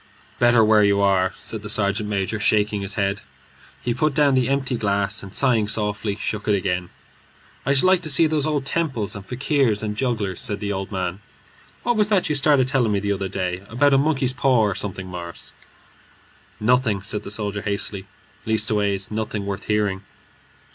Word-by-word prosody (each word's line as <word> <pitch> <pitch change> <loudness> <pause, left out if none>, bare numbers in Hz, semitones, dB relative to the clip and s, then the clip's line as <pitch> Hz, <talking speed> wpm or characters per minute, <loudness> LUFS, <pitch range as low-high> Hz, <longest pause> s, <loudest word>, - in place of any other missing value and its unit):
"Better 120 -2 +5
where 110 0 +5
you 100 0 +3
are," 95 -2 +2
said 110 - -6
the 105 - -7
sergeant 105 0 0
major, 100 +1 -1
shaking 105 0 +1
his 100 0 -3
head. 100 0 -1 0.6
He 120 - 0
put 145 +3 0
down 145 -2 +4
the 130 -1 +2
empty 135 -2 0
glass, 100 -3 0
and 100 - -10
sighing 115 -5 +2
softly, 105 -1 -1
shook 105 +1 -4
it 105 - +3
again. 90 -2 -2 0.8
"I 140 - +3
should 135 - +3
like 185 -1 +4
to 155 - -2
see 150 +3 +6
those 155 -2 0
old 145 -3 -1
temples 135 -9 -1
and 100 - -7
fakirs 125 -2 0
and 105 -1 -3
jugglers," 110 -6 -2
said 105 -5 -2
the 100 -1 -2
old 95 +1 -5
man. 95 -1 -3 0.6
"What 240 -2 +1
was 210 -1 +3
that 200 -4 +2
you - - +1
started 145 -2 +3
telling 130 -5 +2
me 100 - +1
the 100 +1 -1
other 95 -1 -3
day 90 -1 -3
about 140 +5 +3
a 135 - +5
monkey's 135 -3 +1
paw 130 -2 +3
or 105 -2 +1
something, 95 -1 -4
Morris?" 85 -2 -7 1.1
"Nothing," 110 -3 +2
said 105 0 -3
the 100 - -8
soldier, 105 -1 -3
hastily. 100 -1 -3 0.4
"Leastways 105 -3 +1
nothing 105 -1 -3
worth 100 0 -5
hearing." 105 -3 0
105 Hz, 190 wpm, -22 LUFS, 100-130 Hz, 1.1 s, see